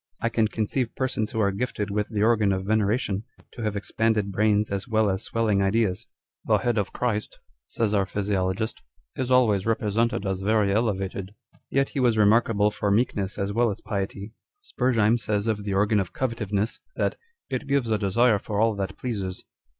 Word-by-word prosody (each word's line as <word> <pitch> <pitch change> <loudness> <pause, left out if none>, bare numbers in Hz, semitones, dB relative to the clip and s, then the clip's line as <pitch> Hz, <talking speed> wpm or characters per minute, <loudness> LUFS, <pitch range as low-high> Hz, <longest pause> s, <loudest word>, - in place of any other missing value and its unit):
I 115 - 0
can 115 -1 +2
conceive 115 +3 -2
persons 130 -5 -1
who 110 - -3
arc 100 -1 +1
gifted 105 -4 -2
with 105 0 -1
the 105 -2 0
organ 110 -3 +3
of 95 0 -2
venera 110 +1 +2
tion 100 -5 -3 0.3
to 120 - -9
have 105 -2 -1
expanded 105 0 0
brains 105 +1 +2
as 100 +2 -3
well 110 -3 +2
as 95 +1 -2
swelling 110 -3 +1
ideas. 95 -1 +1 0.2
" - - -68
The - - +4
head 120 -3 0
of 100 - -2
CHRIST," 110 -4 -2 0.3
says 110 -2 -1
our 100 -2 +2
physiologist, 100 +1 -1 0.2
" - - -48
is 130 -1 -2
always 115 -6 +3
represented 115 0 0
as 95 -1 -2
very 105 0 +2
elevated." 100 -2 -1 0.2
â€" - - -27
Yet 135 0 +1
he 140 - -4
was 120 -3 +3
remarkable 105 0 +4
for 105 0 -2
meekness 100 -2 0
as 100 +1 -2
well 120 +1 +3
as 100 - -4
piety. 100 0 -4 0.3
Spurzheim 120 - +2
says 105 -2 -1
of 110 -2 -1
the 100 -2 -1
organ 105 +2 +3
of 95 - -3
covetiveness, 110 -4 -2 0.2
that - - 0 0.2
" 470 - -60
it 130 +2 -3
gives 135 -5 +1
a 110 - +2
desire 105 +2 +3
for 105 +1 -3
all 110 0 +3
that 95 -1 -4
pleases." 100 -7 -4
105 Hz, 195 wpm, -25 LUFS, 100-115 Hz, 0.3 s, The